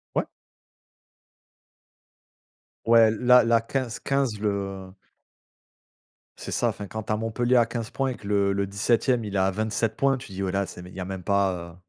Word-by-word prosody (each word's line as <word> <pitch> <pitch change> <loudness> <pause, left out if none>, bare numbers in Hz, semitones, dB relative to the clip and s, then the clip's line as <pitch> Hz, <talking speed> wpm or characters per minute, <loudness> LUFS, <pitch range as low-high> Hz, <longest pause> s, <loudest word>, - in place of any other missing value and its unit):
Ouais. - - 0 2.6
Ouais, 115 -1 +6
la 125 +2 +5
la 115 0 +3
15- 125 0 -3
15, 135 -6 -1
le 95 -2 -3 1.5
C'est - - -7
ça, - - +1
enfin 100 - -6
quand 110 +2 -6
tu - - -5
as - - 0
Montpellier 120 +3 +1
à 120 - +5
15 115 -1 -5
points 135 -1 -1
et 125 - -4
que 100 - -11
le 100 -1 +2
le 100 0 0
17e 115 +4 +1
il 100 -1 -5
est - - +2
à 95 +1 +2
27 110 +2 -1
points, 135 -1 +2
tu 125 -5 -11
dis: 95 +1 -5
«Ouais, 95 - -1
là 100 +1 0
c'est 90 - -10
mais 90 - -11
il - - -14
y - - -7
a 90 - -3
même 95 -2 -6
pas, 100 -1 +2 0.2
heu» - - -17
110 Hz, 195 wpm, -25 LUFS, 100-120 Hz, 2.6 s, Ouais